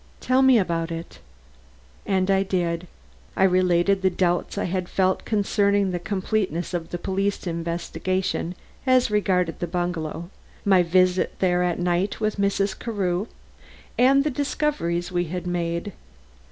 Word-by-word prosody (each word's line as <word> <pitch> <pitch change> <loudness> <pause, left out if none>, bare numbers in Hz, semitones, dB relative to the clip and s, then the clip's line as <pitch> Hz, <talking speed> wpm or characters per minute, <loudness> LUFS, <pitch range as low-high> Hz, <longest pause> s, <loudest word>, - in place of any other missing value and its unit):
"Tell 255 +1 +2
me 265 -2 +6
about 170 -4 0
it." 165 +1 -7 0.9
And 190 0 +1
I 195 0 +3
did. 180 -2 -1 0.5
I - - +3
related 185 +1 +3
the 190 - +3
doubts 180 +1 0
I - - 0
had 180 0 -2
felt 190 -1 +1
concerning 200 -2 +1
the 175 - -2
completeness 185 -1 -2
of 170 -2 -3
the 175 - -3
police 195 +3 -2
investigation 170 +1 -2 0.3
as 255 -3 +4
regarded 185 -5 +1
the 175 - -2
bungalow; 170 -1 -3 0.3
my 190 -2 +5
visit 185 +1 +2
there 180 -1 +2
at 180 -1 0
night 180 +2 0
with 215 -1 -1
Mrs. 200 0 0
Carew, 200 -3 -1 0.7
and 270 +3 +5
the 300 - 0
discoveries 250 - -1
we 175 -1 0
had 180 +2 -5
made. 175 +2 -2
185 Hz, 140 wpm, -24 LUFS, 175-200 Hz, 0.9 s, me